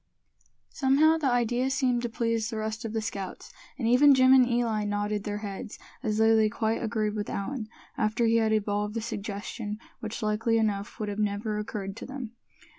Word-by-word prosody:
Somehow, 300 +4 +4
the 285 -4 +1
idea 245 +1 +1
seemed 260 -3 +1
to 240 - -2
please 230 -1 -1
the 225 - -4
rest 220 +1 -3
of 225 - -4
the 220 -1 -1
scouts; 195 -3 -6 0.2
and 235 -5 -1
even 270 +4 +7
Jim 260 0 +6
and 255 -2 +6
Eli 235 -3 +1
nodded 205 0 -2
their 205 -1 -2
heads, 200 +1 -6 0.2
as 215 -4 -1
though 220 0 +5
they 220 -1 +4
quite 220 +1 -1
agreed 215 -2 -1
with 210 -1 -3
Allan, 220 +2 -3 0.3
after 215 +2 +1
he 230 0 +4
had 220 -1 +2
evolved 210 0 0
the 230 - -1
suggestion, 210 -1 -5 0.2
which 220 0 -5
likely 220 +2 +1
enough 210 -1 -1
would 215 - -2
have 205 +1 -4
never 210 +1 -1
occurred 200 -2 -5
to - - -7
them. 260 -4 -6
220 Hz, 190 wpm, -28 LUFS, 210-240 Hz, 0.3 s, even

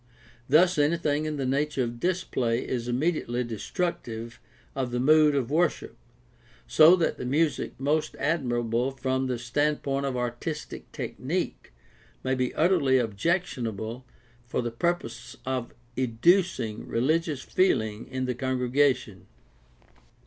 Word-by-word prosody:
Thus 175 +4 +5
anything 150 0 +1
in 155 -1 -2
the 135 - -2
nature 140 +1 0
of 120 0 -5
display 130 -10 0
is 120 -2 -2
immediately 125 -2 0
destructive 115 - -4 0.4
of 130 -2 -1
the 120 0 -2
mood 150 +2 +5
of 135 -2 -1
worship, 170 +2 0 0.7
so 160 +3 +7
that 170 -3 0
the - - -4
music 150 -2 0
most 150 +3 0
admirable 120 -5 0
from 130 0 -1
the 125 -1 -1
standpoint 140 +2 0
of 130 -2 -2
artistic 125 +6 -4
tech - - -6
nique - - -3 0.5
may 130 - 0
be 130 -1 0
utterly 155 -6 +3
objectionable 115 - -2 0.4
for 125 - -1
the 120 - -2
purpose 120 -5 -3
of 130 -2 -2 0.2
educing 130 - +1
religious 150 +3 0
feeling 110 - +1
in 130 0 -3
the 125 - -1
congregation. 130 -4 0
130 Hz, 125 wpm, -27 LUFS, 120-155 Hz, 0.7 s, so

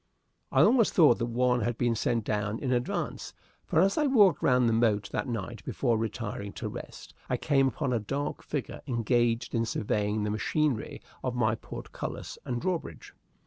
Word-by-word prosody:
I - - +5
almost 235 -3 +4
thought 150 -9 +6
that 120 - -1
one 125 +1 +1
had 120 +2 -1
been 120 -1 +1
sent 115 0 0
down 105 +1 -1
in 130 0 -2
advance, 125 -1 -2 0.3
for, 160 - +2
as 195 - +3
I 300 - +3
walked 210 -9 +5
round 125 -2 +4
the 115 - +2
moat 105 -3 +2
that 105 - -2
night 115 -1 -5
before 120 -4 0
retiring 110 -1 -4
to - - -5
rest, - - -9 0.2
I - - +1
came 135 -1 +2
upon 125 +1 -1
a 120 - +1
dark 140 +7 -3
figure 145 -3 -5
engaged 120 -1 +1
in 115 -1 +1
surveying 105 -1 -1
the 105 - -1
machinery 125 +3 -1 0.2
of 130 -1 -2
my 115 -3 +2
portcullis 110 - -7
and 120 -1 -2
drawbridge. 165 - -4
120 Hz, 180 wpm, -29 LUFS, 110-135 Hz, 0.3 s, thought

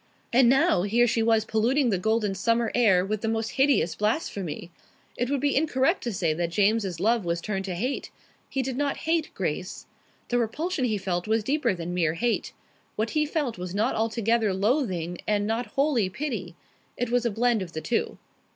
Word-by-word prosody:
And 245 0 +6
now 275 - +4
here 225 +5 +3
she 230 -1 +1
was 225 -1 +3
polluting 240 +4 +2
the 190 - +1
golden 220 0 +1
summer 230 +4 +1
air 195 -7 +4
with 210 +1 -2
the 225 - -2
most 225 0 -1
hideous 270 - +2
blasphemy. 200 - -2 0.4
It 245 +1 -1
would 280 -1 0
be 285 0 +1
incorrect 295 +3 +2
to 240 - -1
say 175 -5 0
that 170 +1 -2
James's 200 -1 +1
love 225 +3 +2
was 170 -1 -1
turned 195 +1 -3
to 185 -2 -3
hate. 250 +10 -3 0.4
He 270 - -1
did 255 0 -4
not 285 0 0
hate 325 -1 +1
Grace. 180 0 -3 0.4
The 245 - +2
repulsion 290 +6 -1
he 220 -3 0
felt 185 -1 -2
was 220 0 +1
deeper 265 -4 +1
than 175 0 -5
mere 165 -3 +1
hate. 235 +7 -1 0.4
What 220 +1 -1
he 300 -1 +1
felt 290 - -2
was 180 +1 -5
not 220 +5 +1
altogether 225 -2 +1
loathing 190 - 0
and 205 -1 +1
not 225 +2 -1
wholly 270 -9 +2
pity. 210 - -4 0.4
It 245 -1 -2
was 245 -1 +2
a 235 - +1
blend 230 0 +1
of 175 -3 -6
the 160 - -4
two. 235 - -1
225 Hz, 195 wpm, -26 LUFS, 190-245 Hz, 0.4 s, And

